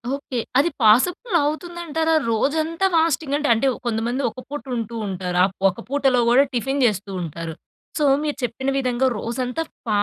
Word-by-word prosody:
Okay. 265 -3 -5 0.2
అది 330 - +3
possible 345 - +3
అవుతుంది 345 +4 -3
అంటారా 320 +1 0 0.2
రోజంతా 315 - 0
ఫాస్టింగ్ 315 -3 +1
అంటే 295 - -1
అంటే 230 +5 +1 0.2
కొంతమంది 235 +3 -1
ఒక 255 - -11
పూట 290 +1 -5
ఉంటూ 230 0 -4
ఉంటారు. 180 -2 -3
ఆహ్, 190 0 +1 0.2
ఒక 185 - -8
పూటలో 270 -3 +2
గూడా 255 +3 +6
టిఫిన్ 270 +3 -1
జెస్తూ 205 -3 -1
ఉంటారు. 165 0 -5 0.5
సో, 300 - +3 0.2
మీరు 295 -2 -2
చెప్పిన 245 +3 -2
విధంగా 255 -1 0
రోజంతా 250 +6 -3 0.2
ఫ - - -5
265 Hz, 160 wpm, -22 LUFS, 225-300 Hz, 0.5 s, గూడా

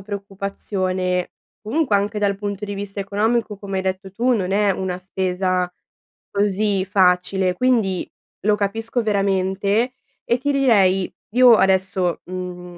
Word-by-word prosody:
preoccupazione; 190 -2 -3 0.3
comunque, 245 +2 0
anche 205 +1 +1
dal 200 -1 +1
punto 200 0 -4
di 205 - -5
vista 200 0 -4
economico, 210 +2 0
come 195 -1 -5
hai 190 - -1
detto 190 +1 -3
tu, 240 +6 +1
non 190 -6 0
è 205 0 +3
una 185 -1 -2
spesa 185 -1 -1 0.6
così 200 -1 +1
facile, 185 -1 +2
quindi 220 -4 +1 0.3
lo 210 +1 +3
capisco 225 +4 -1
veramente 200 +3 +1 0.3
e 240 - +1
ti 285 +3 -1
direi: 200 -9 +3 0.2
io 250 -1 +8
adesso 190 -3 +2
mhmm, 180 -1 -7
195 Hz, 130 wpm, -21 LUFS, 185-210 Hz, 0.6 s, io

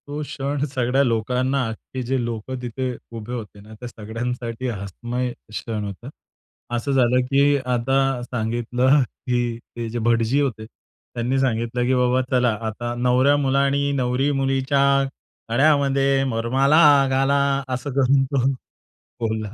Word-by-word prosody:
तो 145 +1 -4
क्षण 140 0 -3
सगळ्या 130 -1 +1
लोकांना, 125 +3 0
अख्खे 120 +3 -7
जे 125 0 -1
लोकं 115 +2 -4
तिथे 125 +1 -3 0.2
उभे 115 +2 -7
होते 105 -4 -7
ना, 110 +2 -13
त्या 125 - -7
सगळ्यांसाठी 115 +2 -5
हसमय 120 +4 -4 0.2
क्षण 110 0 -4
होता. 100 +5 -7 0.7
असं 130 +4 -2
झालं 125 -1 +3
की 140 +1 +4
आता 125 +1 +1 0.3
सांगितलं 120 +3 +1 0.3
की 120 -2 0
ते 120 0 -7
जे 120 +2 -3
भटजी 115 +3 +2
होते 120 -6 -2
त्यांनी 120 +3 -5
सांगितलं 120 -1 0
की 130 - +2
बाबा 125 0 +2
चला 125 -1 +3 0.2
आता 120 +2 -4
नवऱ्यामुलानी 140 +3 +2
नवरी 130 +2 +1
मुलीच्या 135 0 +1 0.7
गळ्यामध्ये 135 0 +3
वरमाला 135 +7 +3 0.3
घाला. 140 +1 +2
असं 130 +3 -4
करून 135 0 +3
तो 135 -1 0 0.8
बोलला. 110 -2 -2
125 Hz, 130 wpm, -22 LUFS, 115-135 Hz, 0.8 s, की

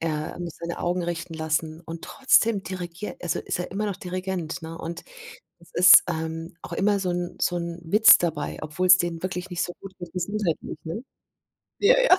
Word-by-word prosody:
Er 155 0 -3
muss 170 -3 -6
seine 170 0 -4
Augen 175 0 0
richten 170 -1 -4
lassen 160 0 -2
und 165 -1 -8
trotzdem 230 -6 +3
dirigiert 180 +1 -6
also 175 - -1
ist - - -3
er 180 - -4
immer 210 +2 -1
noch 200 -3 -3
Dirigent, 185 -3 -4
ne, 165 +1 -7
und 170 +1 -6 0.6
es 170 - -20
ist, 180 0 +9
ähm, 165 0 -4
auch - - -9
immer 205 0 +2
so 185 -2 -1
'n 175 0 -3
so 175 - +1
'n 170 0 -4
Witz 210 +7 +7
dabei, 160 -4 -2
obwohl's 180 +4 +5
denen 170 -1 -2
wirklich 185 0 -4
nicht 175 -1 -1
so 175 - -3
gut 195 -1 -9
mit 175 -2 -9
Gesundheit 185 -1 -1
lief, - - -7
ne? 165 +9 -5 0.8
Ja, 475 +5 +6
ja, 380 -7 +6
175 Hz, 195 wpm, -25 LUFS, 165-185 Hz, 0.8 s, ist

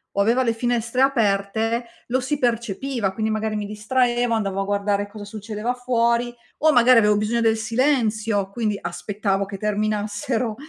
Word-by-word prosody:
o 200 - +2
aveva 235 +5 +3
le 230 -2 +1
finestre 240 +1 -1
aperte 225 -2 +1 0.2
lo 255 +2 +1
si 270 +4 -1
percepiva, 235 -3 -1
quindi 220 +2 -1
magari 215 0 -1
mi 210 - -2
distraevo, 240 +3 0
andavo 195 -3 -1
a - - 0
guardare 205 0 -1
cosa 205 0 -9
succedeva 215 +3 -4
fuori 240 -1 +1 0.3
o 310 +1 +5
magari 245 -2 +6
avevo 210 -1 +3
bisogno 220 +3 0
del 225 -1 +3
silenzio, 220 -4 0
quindi 215 -2 -1
aspettavo 195 +3 -2
che 195 0 -7
terminassero 215 +3 -1
220 Hz, 155 wpm, -22 LUFS, 205-240 Hz, 0.3 s, magari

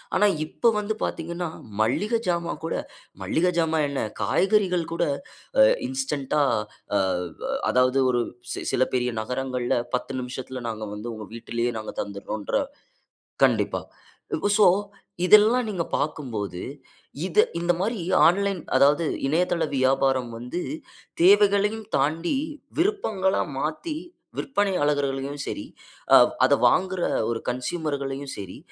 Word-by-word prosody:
ஆனா, 210 - +4 0.2
இப்ப 230 +8 +2
வந்து 210 +1 -1
பாத்தீங்கன்னா 170 +1 -3 0.3
மல்லிகஜாமான் 180 - 0
கூட, 165 - -2 0.5
மல்லிகஜாமான் 160 - +1
என்ன 140 - -2 0.2
காய்கறிகள் 190 -3 +2
கூட 170 - 0 0.8
இன்ஸ்டன்ட்டா 150 - -1 0.5
ஆ - - +5 0.4
வ - - -3 0.2
அதாவது 130 +1 +3
ஒரு 120 -1 +1 0.3
சி - - -4
சில 130 - +3
பெரிய 125 0 +1
நகரங்கள்ல 125 +1 -2 0.2
10 130 - -4
நிமிஷத்துல 125 0 -6
நாங்க 110 -1 -5
வந்து 110 +3 -6
உங்க 110 -2 -8
வீட்டிலயே 120 +1 -2
நாங்க 110 - -7
தந்துடோன்ற 100 - -5 0.9
கண்டிப்பா. - - +1 0.8
சோ 210 - +7 0.6
இதெல்லாம் 220 +5 +6
நீங்கப் 175 -5 -3
பாக்கும்போது, 110 - -3 0.6
இத 180 - -3 0.2
இந்த 175 +1 +2
மாரி 215 0 -1 0.3
ஆன்லைன் 195 +2 +2 0.2
அதாவது, 145 +5 +4 0.2
இணையதள 170 +3 +1
வியாபாரம் 130 -1 +2
வந்து 125 +9 -4 0.6
தேவைகளையும் 205 +2 +4
தாண்டி 160 - 0 0.4
விருப்பங்களா 220 - +1 0.2
மாத்தி 160 - -3 0.4
விற்பனை 205 -7 0
ஆளர்களையும் 140 -1 -1
சரி, - - -4 0.5
அ - - +11 0.3
அத - - +4
வாங்குற 185 -1 +2 0.3
ஒரு 115 - -2
கன்சுயுமர்களையும் 140 +1 -3
சரி, 95 -3 -8
155 Hz, 110 wpm, -25 LUFS, 130-190 Hz, 0.9 s, அ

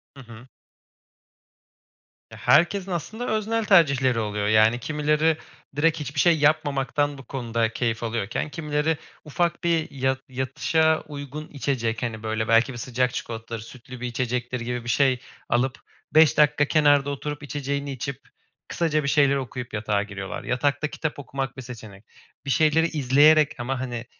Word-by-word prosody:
Hı 135 - -11
hı. 115 +2 -13 1.8
Ya, - - -11
herkesin 190 +4 +3
aslında 220 +8 -4
öznel 220 +1 0
tercihleri 140 - +4
oluyor, 105 -1 -2
yani 110 +2 +4
kimileri 150 +3 +1 0.4
direkt 155 +2 +2
hiçbir 145 0 -4
şey 170 +1 +5
yapmamaktan 145 -1 +1
bu 135 - -11
konuda 115 -4 -1
keyif 115 -2 -1
alıyorken 115 +4 -2
kimileri 150 +1 -1 0.3
ufak 170 +3 -1
bir 165 -2 +1
ya 130 -1 0
yatışa 155 +5 +1
uygun 145 +1 -7
içecek, 120 -4 -2
hani, 110 -2 -4
böyle 110 +1 -2
belki 115 +3 +3
bir - - -8
sıcak 125 +1 -1
çikolatadır, 115 0 -5
sütlü 125 +3 -11
bir 125 - -2
içecektir 125 0 -2
gibi 120 0 -4
bir 120 - -6
şey 130 0 +3 0.3
alıp, 130 +2 +1 0.4
5 155 -2 +6
dakika 150 0 +4
kenarda 145 -2 +3
oturup, 145 +1 -5
içeceğini 140 0 -3
içip, 135 +1 -5 0.5
kısaca 155 -3 0
bir - - -2
şeyler 140 -1 +4
okuyup 125 -2 -5
yatağa 105 -1 0
giriyorlar. 100 -2 -6
Yatakta 145 +4 0
kitap 155 -1 -4
okumak 135 -1 -5
bir 130 - -6
seçenek. 110 -5 -11 0.4
Bir - - -5
şeyleri 160 +4 +3
izleyerek 150 0 +4
ama, 130 +2 -2
hani, 120 -2 -4
135 Hz, 150 wpm, -24 LUFS, 120-150 Hz, 1.8 s, 5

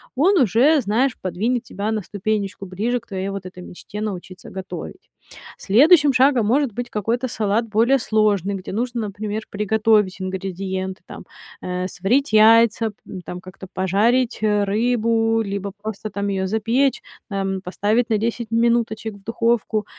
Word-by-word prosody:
он 360 +8 +4
уже, 260 - +4
знаешь, 220 +4 +1 0.2
подвинет 220 +7 -1
тебя 210 -2 -4
на 220 -1 -1
ступенечку 205 0 -3
ближе 215 +7 -2
к 230 - -28
твоей 190 -1 -4
вот 195 -1 -6
этой 185 0 -9
мечте 190 +3 -9
научиться 185 -3 -6
готовить. 190 0 -8 0.5
Следующим 290 - +5
шагом 255 -3 +4
может 265 +4 +2
быть 245 +3 -5
какой-то 230 +5 -1
салат 220 0 0
более 235 +6 +3
сложный, 210 -4 +1
где 190 -1 -7
нужно, 240 +2 -2
например, 210 +1 -4
приготовить 210 -2 +1
ингредиенты, 190 0 -4
там, - - -10 0.4
э, 180 0 -3
сварить 225 +10 0
яйца, 225 +1 +5
п 200 -2 -11
там 180 0 -7
как-то 185 +1 -11
пожарить 220 +7 +1
рыбу, 225 +2 +1
либо 200 -1 -4
просто 215 0 -5
там 200 -1 -3
её 190 -1 -1
запечь, 230 +7 +1 0.3
там, 195 -1 -2
поставить 210 +6 0
на 220 - +2
10 230 +1 -2
минуточек 230 -2 +1
в 200 - -17
духовку. 230 -1 0
215 Hz, 145 wpm, -21 LUFS, 195-235 Hz, 0.5 s, Следующим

